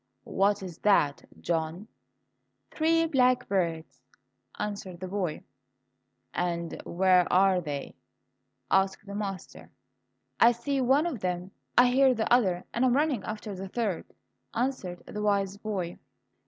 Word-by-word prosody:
"What 200 +1 +2
is 180 -4 -8
that, 150 -9 +2 0.2
John?" 165 +4 -2 0.8
"Three 330 +1 +2
blackbirds," 195 - +1 0.6
answered 200 -4 -5
the 185 - -5
boy. 185 -4 -3 0.9
"And 170 -1 -2
where 180 0 +3
are 185 0 +4
they?" 145 -4 -5 0.8
asked 190 +2 +2
the 200 - -8
master. 200 -2 -6 0.7
"I 235 +1 +7
see 270 +3 -2
one 270 +5 +3
of 315 -10 -3
them, 180 0 -3 0.3
I 245 - +8
hear 260 0 +4
the 225 +1 +1
other, 185 -8 +3
and 240 - 0
I - - +5
am 245 - +3
running 285 -7 +1
after 215 -1 -5
the 190 +1 -6
third," 210 -5 -2 0.5
answered 230 -8 -2
the 210 - -6
wise 200 -1 +1
boy. 195 -5 -4
200 Hz, 130 wpm, -28 LUFS, 180-240 Hz, 0.9 s, I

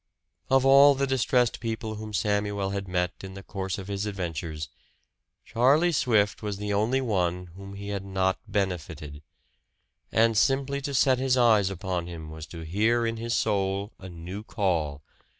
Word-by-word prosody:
Of 135 0 +4
all 140 +1 +8
the 140 +1 +1
distressed 130 -2 +1
people 110 -1 -3
whom 110 0 -7
Samuel 105 -1 0
had 100 -1 -3
met 90 -1 0
in 95 0 -8
the 95 - -9
course 95 -2 -4
of 95 -1 -7
his 100 +1 -3
adventures, 80 -5 -4 0.8
Charlie 145 +9 +3
Swift 110 -9 +2
was 105 -2 -3
the 105 0 -3
only 115 +6 +1
one 90 -6 -1
whom 100 +1 -9
he 100 +1 -7
had 100 -1 -3
not 95 -1 0
benefited. 80 -7 -3 0.9
And 115 0 +3
simply 135 +4 +2
to 140 0 -3
set 130 0 +3 0.2
eyes 110 -6 +4
upon 95 -2 -3
him 80 -3 -8
was 80 0 -8
to 85 - -9
hear 110 +8 +1
in 115 0 -2
his 115 +1 -2
soul 100 0 0
a 95 - -9
new 90 +4 -7
call. 85 - -1
100 Hz, 165 wpm, -27 LUFS, 90-115 Hz, 0.9 s, all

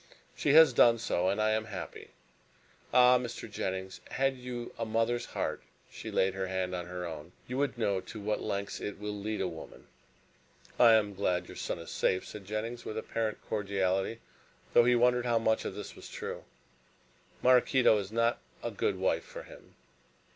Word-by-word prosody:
She 145 - +2
has 160 -3 +8
done 115 0 +6
so, 95 -5 0
and 100 - 0
I 110 0 +3
am 110 0 0
happy. 90 -7 -7 0.8
Ah, 125 0 +6
Mr. 120 -2 -6
Jennings, 95 -3 -4
had 135 0 +1
you 125 -1 -6
a - - 0
mother's 115 +2 0
heart," - - -3 0.3
she - - -7
laid 95 0 +2
her 95 -1 -3
hand 95 0 -2
on 90 -1 -4
her 90 0 -5
own, 80 0 -8
"you 125 +2 -3
would 140 -3 0
know 100 -5 0
to 110 - -9
what 105 +1 -1
lengths 100 0 -3
it 105 - -4
will 105 0 -4
lead 105 +1 -3
a 95 - +1
woman!" 80 -2 -10 0.9
"I 115 -2 +8
am 105 -2 +3
glad 90 -2 0
your - - -10
son - - -3
is 85 -1 -9
safe," 95 - +1
said 105 -2 -9
Jennings, 110 +4 -4
with 110 - -5
apparent 110 -1 -3
cordiality, 100 +1 -1 0.5
though 120 - +7
he 125 0 +5
wondered 125 +1 +3
how 120 -1 +3
much 110 -1 +1
of - - -4
this - - -7
was - - -11
true. - - -6 1.0
"Maraquito 125 -1 +5
is 100 0 -6
not 115 +1 +1 0.2
a - - -2
good - - -1
wife - - +1
for - - -9
him. - - -15
110 Hz, 185 wpm, -31 LUFS, 95-120 Hz, 1.0 s, has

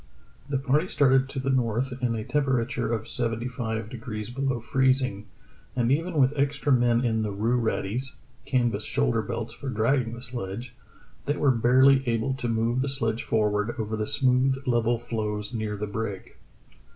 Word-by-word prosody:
The 140 - +1
party 140 +6 +1
started 135 -4 +3
to 140 - -7
the 135 +1 0
north 125 0 0
in 120 -2 +1
a 110 - -3
temperature 125 -3 0
of 110 -1 -2
seventy 115 -1 -2
five 115 -3 -3
degrees 115 -2 -6
below 135 -1 -1
freezing, 130 -3 +1 0.5
and 120 -1 +1
even 165 +5 0
with 135 -1 +4
extra 140 +1 0
men 120 0 +3
in 110 -2 +1
the 110 - -1
rue 110 +5 0
raddies 115 +3 -2 0.3
(canvas 120 -3 +1
shoulder 60 0 +1
belts - - -4
for 140 - -6
dragging 115 +1 +1
the 120 - -9
sledge) 120 -1 -4 0.5
they 145 +1 0
were 140 - +4
barely 130 +3 +5
able 115 +3 0
to 130 -2 -3
move 115 +2 +1
the 140 - 0
sledge 115 -4 -1
forward 105 +1 0
over 110 0 -2
the 105 0 -2
smooth, 130 0 +2
level 120 -1 +2
floes 105 -1 -4
near 110 -2 -3
the 105 - -2
brig. 105 -2 -5
120 Hz, 170 wpm, -26 LUFS, 110-130 Hz, 0.5 s, barely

